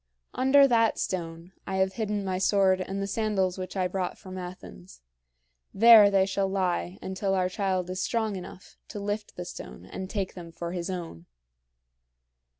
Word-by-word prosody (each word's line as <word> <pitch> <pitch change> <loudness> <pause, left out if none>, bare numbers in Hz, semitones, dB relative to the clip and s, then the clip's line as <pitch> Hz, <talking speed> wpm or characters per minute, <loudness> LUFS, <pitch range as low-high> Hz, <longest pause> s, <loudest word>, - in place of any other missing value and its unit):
Under 275 +2 +5
that 230 -3 +3
stone, 170 -1 -4 0.2
I 190 - -2
have 190 0 +1
hidden 210 -1 -2
my 185 -1 -1
sword 190 -1 +3
and 195 +1 -4
the 195 - -1
sandals 195 -3 -1
which 185 +1 -6
I 185 -1 +1
brought 185 0 -3
from 185 -2 -10
Athens. 95 - -10 0.7
There 220 0 +9
they 195 -1 +3
shall 195 0 0
lie 180 - -1
until 195 +1 -1
our 185 -1 +1
child 185 -1 -1
is 185 0 -3
strong 220 -1 -1
enough 185 0 -10
to 210 - -7
lift 205 +1 -4
the 180 - -6
stone - - -9
and 190 0 -7
take 195 -3 -3
them 170 -2 -9
for 170 +1 -6
his 175 0 -4
own. 165 - -6
190 Hz, 170 wpm, -27 LUFS, 180-200 Hz, 0.7 s, There